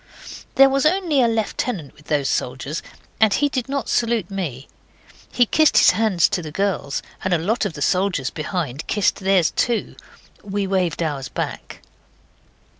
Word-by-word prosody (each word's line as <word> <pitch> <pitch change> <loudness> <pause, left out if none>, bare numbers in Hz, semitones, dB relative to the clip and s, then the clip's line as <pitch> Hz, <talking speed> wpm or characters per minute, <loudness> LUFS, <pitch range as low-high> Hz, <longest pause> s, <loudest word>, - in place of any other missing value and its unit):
There 270 - +8
was 275 +2 +2
only 335 -5 +2
a 240 - +4
lieutenant 220 - -2
with 150 - -20
those 145 -3 0
soldiers, 130 +6 -2 0.4
and 220 -2 +5
he 290 +8 +2
did 260 -2 -3
not 280 -1 -2
salute 230 -5 0
me. 150 -9 -4 0.6
He 245 - +3
kissed 310 +6 +3
his - - +7
hand 200 -3 0
to 175 - +3
the 155 -2 -7
girls; 180 -6 -2 0.2
and 190 -2 +2
a - - +2
lot 210 +8 -1
of 195 - -3
the 145 - -3
soldiers 180 -8 0
behind 155 -3 -4
kissed 205 -2 +1
theirs 190 -4 +2
too. 235 -3 -1 0.5
We 200 0 -2
waved 185 -3 0
ours 140 -5 -3
back. - - -6
195 Hz, 165 wpm, -21 LUFS, 155-235 Hz, 0.6 s, There